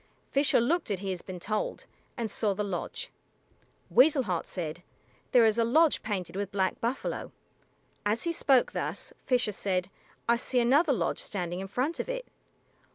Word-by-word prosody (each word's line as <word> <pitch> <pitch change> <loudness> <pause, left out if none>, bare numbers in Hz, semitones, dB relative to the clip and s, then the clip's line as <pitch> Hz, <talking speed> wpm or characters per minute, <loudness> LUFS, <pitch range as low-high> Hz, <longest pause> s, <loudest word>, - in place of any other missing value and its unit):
Fisher 280 -1 +4
looked 310 +7 +1
as 195 -3 -1
he 195 -1 -2
had 180 -2 -5
been 185 -2 -6
told, 215 +4 -2 0.3
and 230 -3 -2
saw 205 -2 0
the 210 - -1
lodge. 195 -4 -4 0.8
Weasel 275 +1 +6
Heart 180 -7 -2
said, 170 -2 -4 0.5
"There 245 -3 +6
is 220 +1 +3
a - - +5
lodge 305 +7 +4
painted 195 -5 -3
with 200 0 -3
black 190 -1 0
buffalo." 240 +3 -2 0.7
As 210 +2 0
he 335 - 0
spoke 270 -6 +3
thus, - - -4
Fisher 245 -4 +3
said, 185 -2 -1 0.4
"I 235 0 +4
see 250 +1 0
another 280 +7 +4
lodge, 255 - 0
standing 180 -3 -3
in 195 - -5
front 260 - -1
of - - -3
it." - - -3
220 Hz, 170 wpm, -29 LUFS, 190-260 Hz, 0.8 s, Weasel